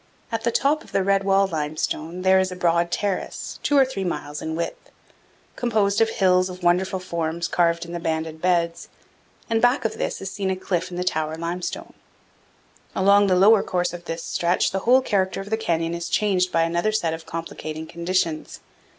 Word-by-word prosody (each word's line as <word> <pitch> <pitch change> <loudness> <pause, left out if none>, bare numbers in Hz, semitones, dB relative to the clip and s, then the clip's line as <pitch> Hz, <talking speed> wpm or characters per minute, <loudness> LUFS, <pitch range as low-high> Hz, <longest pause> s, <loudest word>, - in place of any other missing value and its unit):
At 225 -1 -2
the 235 - +1
top 295 +6 +1
of - - -18
the 195 - +2
red 195 0 +2
wall 195 0 +3
limestone 160 +1 -3
there 190 0 +5
is 190 0 0
a - - -5
broad 170 -1 +1
terrace, 200 +1 -3
two 290 - +2
or 270 - +6
three 255 -7 -4
miles 150 -4 -4
in 160 0 -3
width, 170 +1 -5 0.7
composed 215 -3 +1
of 225 - +4
hills 185 -3 +3
of 180 0 -9
wonderful 185 +2 +2
forms 170 -2 -3
carved 170 -1 +1
in 170 - -9
the 175 - -3
banded 160 -1 -3
beds, 170 -2 0 0.6
and 225 -1 +1
back 245 +1 +3
of 225 - -2
this - - -2
is 195 0 -5
seen 195 -1 -2
a 190 - 0
cliff 185 -1 -2
in 175 - -7
the 180 - -1
tower 160 -3 -1
limestone. 170 +2 -4 1.0
Along 200 +1 +5
the 185 - +3
lower 200 +3 +6
course 180 -1 -1
of 175 0 -8
this 165 0 -4
stretch 175 +1 +1
the 195 - -1
whole 260 +1 +7
character 195 -7 0
of 195 +2 -7
the - - +3
canyon 165 -6 -1
is 170 0 -4
changed 185 -3 +1
by 165 - +3
another 170 +5 0
set 175 -7 0
of 165 0 -8
complicating 160 -1 -6
conditions. 170 -1 -2
180 Hz, 200 wpm, -23 LUFS, 170-195 Hz, 1.0 s, whole